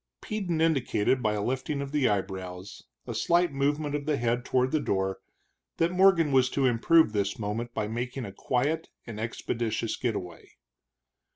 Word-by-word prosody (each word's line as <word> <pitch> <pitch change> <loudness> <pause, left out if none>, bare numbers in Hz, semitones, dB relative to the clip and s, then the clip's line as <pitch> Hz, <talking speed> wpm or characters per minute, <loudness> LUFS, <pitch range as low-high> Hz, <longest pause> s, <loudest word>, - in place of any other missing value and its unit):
Peden 185 -7 -2
indicated 135 -6 +2
by 110 -2 +1
a 105 -1 -2
lifting 130 +4 -2
of 140 0 -4
the 145 -3 +2
eyebrows, 95 -1 -4 0.2
a - - -5
slight 170 -2 +2
movement 145 +2 0
of 145 0 -3
the 150 -2 +1
head 120 0 0
toward 130 0 +1
the 155 - +2
door, 95 -7 -1 0.6
that 165 +1 +2
Morgan 180 -4 +4
was 130 -1 +4
to 135 0 0
improve 125 +2 +4
this 100 -1 -1
moment 115 +3 -3
by 105 -1 -1
making 120 +3 -4
a 100 - -7
quiet 145 +9 -1 0.2
and 115 -3 -7
expeditious 115 0 -2
get 120 -4 -1
away. 90 -4 -8
125 Hz, 170 wpm, -28 LUFS, 105-150 Hz, 0.6 s, Morgan